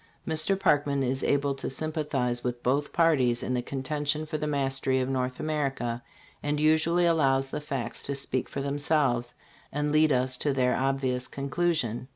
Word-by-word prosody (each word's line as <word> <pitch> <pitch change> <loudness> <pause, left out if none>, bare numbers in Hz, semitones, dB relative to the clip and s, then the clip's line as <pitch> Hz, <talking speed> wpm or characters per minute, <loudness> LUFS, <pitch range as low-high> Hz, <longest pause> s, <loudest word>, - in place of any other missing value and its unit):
Mr. 160 +4 +1
Parkman 145 -4 +2
is 130 +1 -1
able 140 0 +2
to 135 - -5
sympa 155 +3 -2
thize 125 -4 -1
with 120 -1 -3
both 140 +3 +1
parties 130 -8 +3
in 125 - -1
the 125 - 0
contention 145 +4 -2
for 155 0 -4
the 150 - -2
mastery 135 -2 0
of 130 - 0
North 130 -1 -2
America, 135 -6 -2 0.4
and 145 0 -1
usually 160 +3 +3
allows 135 -5 +2
the 150 - -3
facts 135 -5 -4
to 140 - -3
speak 130 -2 -2
for 140 - -4
themselves 140 -4 +1 0.4
and 150 +1 -1
lead 155 0 +4
us 130 0 +1
to 145 +2 0
their 125 -2 +2
ob 135 +1 0
vious 125 -1 -1
conclusion. 140 -4 -1
140 Hz, 180 wpm, -28 LUFS, 130-150 Hz, 0.4 s, lead